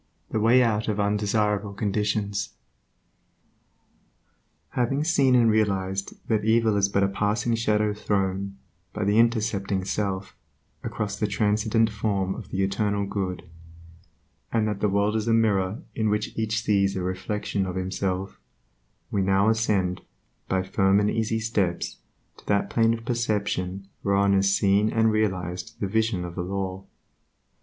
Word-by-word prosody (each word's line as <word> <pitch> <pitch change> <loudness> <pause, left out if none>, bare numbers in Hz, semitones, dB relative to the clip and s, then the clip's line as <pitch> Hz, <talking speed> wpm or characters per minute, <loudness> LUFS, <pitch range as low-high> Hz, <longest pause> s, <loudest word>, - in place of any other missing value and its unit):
The 110 - 0
way 120 +4 +5
out 110 -2 0
of 105 -1 -1
undesirable 105 0 0
conditions 105 -1 -1 2.1
Having 135 +4 0
seen 140 -6 +3
and 120 -2 +5
realized 95 -3 0
that 110 -2 +1
evil 110 0 +3
is 100 -1 +2
but 100 0 +1
a - - +4
passing 105 +3 0
shadow 105 -2 +1
thrown, 100 -1 -2 0.4
by 105 - -2
the 105 +3 +3
intercepting 105 -5 +1
self, 95 -2 -3 0.5
across 105 -1 -3
the 105 - +1
transcendent 110 +2 +1
Form 100 -2 -1
of - - -9
the 95 +1 -1
Eternal 100 +1 0
Good, 95 -3 -3 1.1
and 110 -2 +1
that 105 -2 -2
the 105 - +1
world 100 +2 +1
is 110 0 -1
a 115 - +3
mirror 105 - +1
in 110 -2 0
which 105 +1 -1
each 110 0 -1
sees 100 -2 +2
a 95 - -2
reflection 95 +1 -2
of 90 - -4
himself, 95 +1 -3 0.7
we 100 - +1
now 95 +2 +3
ascend, 100 -5 +1 0.5
by 95 -1 +1
firm 95 +1 +2
and 105 0 +1
easy 115 0 0
steps, 105 -6 -1 0.4
to - - -18
that 100 -1 +1
plane 115 0 +3
of 115 0 -10
perception 100 -5 -2
whereon 100 0 +2
is 95 0 +3
seen 100 +2 +3
and 110 0 +2
realized 95 -1 -2
the - - -1
Vision 110 -3 0
of 85 - -7
the 90 - -3
Law. 95 0 -4
105 Hz, 150 wpm, -25 LUFS, 95-110 Hz, 2.1 s, way